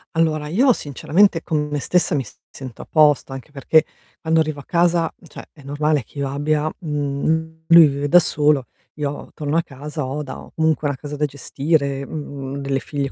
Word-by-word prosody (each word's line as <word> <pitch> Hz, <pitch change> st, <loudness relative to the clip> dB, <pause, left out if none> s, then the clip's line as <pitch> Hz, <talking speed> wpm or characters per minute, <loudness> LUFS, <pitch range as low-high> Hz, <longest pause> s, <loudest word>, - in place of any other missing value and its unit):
Allora, 155 Hz, -2 st, +1 dB
io 245 Hz, -, +4 dB
sinceramente, 165 Hz, +5 st, +1 dB
con 150 Hz, -3 st, -1 dB
me 150 Hz, 0 st, -3 dB
stessa 180 Hz, +1 st, +1 dB
mi 135 Hz, -4 st, -1 dB, 0.2 s
sento 130 Hz, -4 st, -9 dB
a -, -, -9 dB
posto, 150 Hz, -3 st, +4 dB
anche 135 Hz, +3 st, -8 dB
perché 155 Hz, +3 st, +3 dB, 0.3 s
quando 160 Hz, 0 st, +1 dB
arrivo 155 Hz, -2 st, -1 dB
a -, -, -11 dB
casa, 170 Hz, -1 st, +2 dB
cioè -, -, -11 dB
è 150 Hz, -, -17 dB
normale 145 Hz, 0 st, 0 dB
che 140 Hz, -, -18 dB
io 140 Hz, -1 st, -1 dB
abbia 150 Hz, +2 st, 0 dB, 0.2 s
mhmm, 160 Hz, +2 st, -2 dB
lui 170 Hz, -1 st, +9 dB
vive 140 Hz, +1 st, -2 dB
da 175 Hz, -, +6 dB
solo, 150 Hz, -5 st, +3 dB, 0.3 s
io 145 Hz, -1 st, -4 dB
torno 150 Hz, +1 st, -2 dB
a -, -, +4 dB
casa, 150 Hz, 0 st, -6 dB
ho 150 Hz, +3 st, -3 dB
da 135 Hz, -, -8 dB
ho -, -, -13 dB
comunque 160 Hz, -2 st, +1 dB
una 140 Hz, -2 st, -2 dB
casa 145 Hz, +1 st, -7 dB
da 150 Hz, +1 st, 0 dB
gestire, 140 Hz, 0 st, -1 dB
mhmm, 140 Hz, -3 st, -6 dB
delle 140 Hz, -1 st, -1 dB
figlie 140 Hz, 0 st, -4 dB
150 Hz, 190 wpm, -21 LUFS, 140-160 Hz, 0.3 s, lui